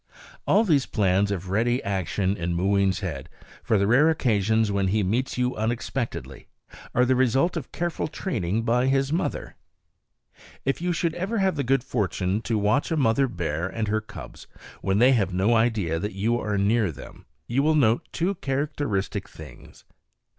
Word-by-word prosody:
All 215 - +4
these 150 - +2
plans 100 -1 +1
of 95 -2 -4
ready 120 +5 +1
action 95 0 -1
in 85 -2 -2
Mooween's 95 +1 +1
head, 75 -9 -5 0.3
for 110 - +1
the 100 - +2
rare 130 +9 +5
occasions 110 -7 +1
when 100 -1 +1
he 105 +2 +1
meets 120 +9 -1
you 125 0 0
unexpectedly, 110 - -4 0.5
are 125 - +4
the 130 +1 +2
result 130 +7 +2
of 155 -7 -5
careful 175 -1 -2
training 115 - -2
by 125 +2 +2
his 135 +2 +1
mother. 175 +2 -3 1.1
If 135 +4 0
you 180 0 0
should 170 -1 0
ever 190 +7 -2
have 190 -3 +1
the 140 - -1
good 135 0 +1
fortune 100 -2 -1
to 115 -1 -1
watch 105 +7 +1
a 165 - 0
mother 135 0 +3
bear 85 - -3
and 110 +2 -3
her 110 +1 0
cubs 110 - -11 0.3
when 95 0 0
they 125 +4 +6
have 100 -8 +1
no 100 +6 +2
idea 110 -8 +1
that 105 +4 -4
you 115 +5 0
are 105 -1 -2
near 100 -1 +2
them, 70 - -13 0.2
you 125 +4 0
will 155 +2 +2
note 120 -6 +2
two 175 +4 0
characteristic 140 - -2
things. - - -13
115 Hz, 175 wpm, -25 LUFS, 100-135 Hz, 1.1 s, they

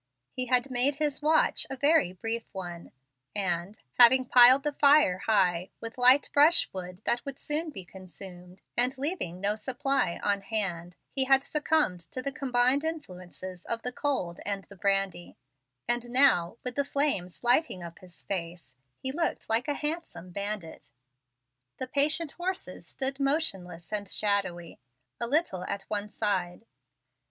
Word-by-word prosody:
He 255 0 -2
had 250 +2 +1
made 255 +3 +2
his 295 -1 -2
watch 315 +1 +2
a 270 - -4
very 285 - +3
brief 225 +5 -4
one, 175 -3 -7 0.4
and, 185 0 -2 0.2
having 255 +2 +7
piled 250 +2 +7
the 295 -1 -1
fire 280 -11 +5
high 180 -4 +2
with 230 0 -8
light 255 +3 +6
brush 310 +4 +6
wood 180 -1 -8
that 240 +1 0
would 275 -1 -7
soon 305 +3 -2
be 190 -11 -9
consumed, 180 0 -12
and 250 +2 +1
leaving 270 - -3
no 200 +2 0
supply 270 - -1
on 200 -1 +1
hand, 180 -5 -2 0.2
he 265 -1 +1
had 270 0 +4
succumbed 300 - 0
to 175 +10 -7
the 275 - -3
combined 260 +1 +1
influence 185 - -7
of 185 +5 -5
the 250 - -3
cold 250 -12 -2
and 200 -1 -3
the 200 - -12
brandy; 195 -2 -1 0.5
and 240 0 +1
now, 240 -8 +3
with 250 -1 -4
the 280 - 0
flames 275 -12 -2
lighting 240 - +2
up 170 -1 -10
his 180 -2 -16
face, 170 -7 -6 0.2
he 265 - -4
looked 330 +4 -2
like 225 +2 +1
a 290 - -1
handsome 300 - -4
bandit. 200 -3 -5 0.9
The 260 - -4
patient 295 +4 +2
horses 370 +2 -5
stood 270 0 -3
motionless 200 - -1
and 205 -2 -3
shadowy, 190 -5 -1 0.4
a 235 - -1
little 270 - 0
at 200 - -4
one 210 0 -1
side. 190 -2 -2
230 Hz, 155 wpm, -28 LUFS, 185-275 Hz, 0.9 s, having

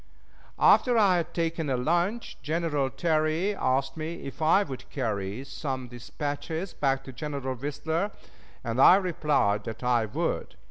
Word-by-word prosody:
After 245 -2 +5
I 195 -5 +5
had 170 0 -2
taken 165 -2 -1
a 130 - +1
lunch, 175 - 0
General 150 -2 0
Terry 160 +5 +1
asked 130 -5 0
me 160 +2 -5
if 135 +3 -8
I 165 +6 +5
would 135 -8 -8
carry 110 -3 -3
some 135 -2 -5
dispatches 145 +8 -5
back 135 -1 0
to 135 - -10
General 140 -1 -4
Whistler, 150 - -2 0.5
and 115 +3 0
I 180 - +9
replied 150 - +1
that 115 +2 -6
I 120 -2 +2
would. - - -2
145 Hz, 145 wpm, -27 LUFS, 130-170 Hz, 0.5 s, I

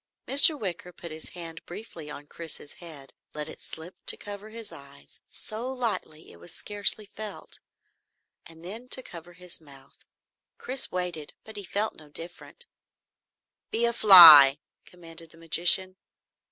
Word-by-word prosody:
Mr. 285 +2 +6
Wicker 180 -4 -6
put 170 -1 -11
his 155 0 -10
hand 165 -1 -10
briefly 175 -5 -10
on 145 0 -10
Chris's 160 -1 -7
head, 150 -5 -13 0.2
let 150 0 -5
it - - -12
slip 165 +3 -11
to - - +6
cover 205 +1 -10
his 225 -1 -9
eyes 140 - -15
so 230 +4 -5
lightly 230 -11 -5
it 85 - -17
was 85 - -12
scarcely 205 +1 0
felt 210 +1 -5 0.9
and 165 0 -16
then 225 +7 -9
to 260 +1 0
cover 175 -3 -12
his 180 -1 -8
mouth. 140 -2 -18 0.5
Chris 260 +1 -2
waited, 180 -4 -5
but 220 - -11
he 205 - -6
felt 205 +3 -3
no 155 -2 -15
different. 175 - -7 1.0
"Be 230 +1 -1
a 235 - 0
fly!" 160 - +9 0.3
commanded 165 -2 -13
the 165 - -14
magician. 175 +3 +3
175 Hz, 150 wpm, -26 LUFS, 160-215 Hz, 1.0 s, fly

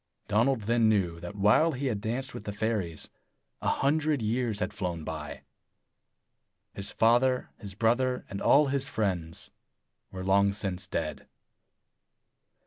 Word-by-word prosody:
Donald 115 +4 +2
then 115 +1 +3
knew 90 -6 +1
that 90 +4 -7
while 105 +11 +4
he 135 +2 -3
had 110 -6 -1
danced 125 +4 -3
with 105 - -8
the 105 - -3
fairies, 100 -6 -2 0.5
a - - -2
hundred 150 +1 +1
years 115 -1 -1
had 105 0 -2
flown 90 -6 -3
by. 75 -3 -6 1.3
His 100 - -2
father, 125 +3 +2
his 100 -3 -9
brother, 125 +4 +1
and 100 - -6
all 145 0 +5
his 135 0 -1
friends 90 -6 -2 0.6
were 95 0 -6
long 100 +1 +4
since 95 -2 -4
dead. - - -4
105 Hz, 135 wpm, -29 LUFS, 95-125 Hz, 1.3 s, all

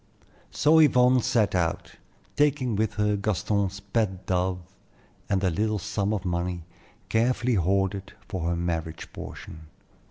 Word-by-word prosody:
So 155 +2 +4
Yvonne 125 -4 +5
set 115 -5 +1
out, 85 -3 -2 0.4
taking 140 -5 +2
with 110 +1 0
her 105 -1 +1
Gaston's 100 -1 -1
pet 100 -2 -2
dove 90 0 0 0.7
and 100 -2 +1
the 95 -2 +1
little 105 +5 0
sum 105 0 -2
of 105 -3 -2
money 90 -1 -2 0.4
carefully 120 +4 +1
hoarded 95 +1 0
for 85 -4 -3
her 85 - 0
marriage 80 -2 -4
portion. 80 -1 -9
100 Hz, 130 wpm, -26 LUFS, 90-110 Hz, 0.7 s, Yvonne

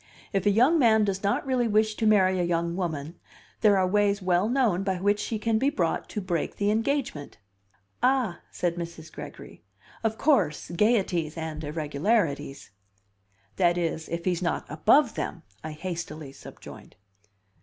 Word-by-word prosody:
If 195 0 +1
a - - +7
young 250 +11 +4
man 220 -4 +4
does 195 -1 -2
not 200 +7 0
really 255 -3 +1
wish 215 0 +2
to 220 - +1
marry 190 -3 +4
a - - +1
young 170 0 -1
woman 165 -3 -4 0.4
there 205 -3 +4
are 190 - +3
ways 200 +1 +2
well 185 +2 +1
known 240 -8 +2
by 195 -1 -1
which 205 +3 +1
she 225 - -2
can 220 +1 0
be 270 +3 +2
brought 175 - -1
to - - -4
break 175 -5 -2
the 205 0 +1
engagement." 225 - -2 0.6
"Ah," 250 -9 +1
said 175 -1 -2
Mrs. 170 -2 -7
Gregory, - - -10 0.4
"of 220 0 0
course; 200 - +1
gayeties 175 -5 +1
and 160 -1 -5
irregularities 150 - -1 0.4
" 100 +1 -40
"That 175 -1 +3
is, 165 -2 -2
if 170 0 -4
he's 180 -2 0
not 175 - -1
above 225 - +3
them," 170 - -5 0.2
I 155 0 -5
hastily 160 -3 -6
subjoined. - - -13
185 Hz, 165 wpm, -26 LUFS, 165-215 Hz, 0.6 s, a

